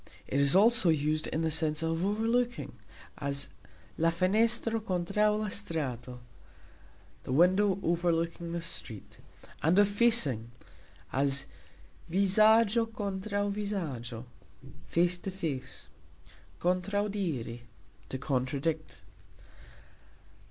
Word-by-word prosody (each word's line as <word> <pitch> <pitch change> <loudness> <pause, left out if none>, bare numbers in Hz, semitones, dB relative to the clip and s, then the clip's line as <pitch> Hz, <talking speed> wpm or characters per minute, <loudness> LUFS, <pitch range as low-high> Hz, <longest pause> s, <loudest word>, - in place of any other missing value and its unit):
It 140 - 0
is 140 +4 +5
also 220 -2 +6
used 155 0 0
in 160 - -2
the 160 - 0
sense 155 0 0
of 165 +1 -1
"overlooking", 230 +4 0 0.5
as 140 -1 -1 0.5
"La 165 +1 +4
fenestro 220 +6 +1
kontraux 210 +2 0
la 215 -1 -2
strato", 125 - -3 1.0
The - - -7
window 185 +6 +4
overlooking 170 0 -1
the 170 0 -3
street; 120 -10 -7 0.4
and 165 +4 +3
of 205 0 +6
"facing", 205 - +3 0.6
as 140 +1 +2 0.6
"Vizagxo 215 +5 +4
kontraux 205 -1 -3
vizagxo", 150 - -4 0.6
Face 175 +1 +1
to 195 - -5
face. 155 -9 -5 0.7
"Kontrauxdiri", 180 - -1 0.5
to 130 - -3
contradict. 140 +3 -2
175 Hz, 95 wpm, -30 LUFS, 150-205 Hz, 1.0 s, also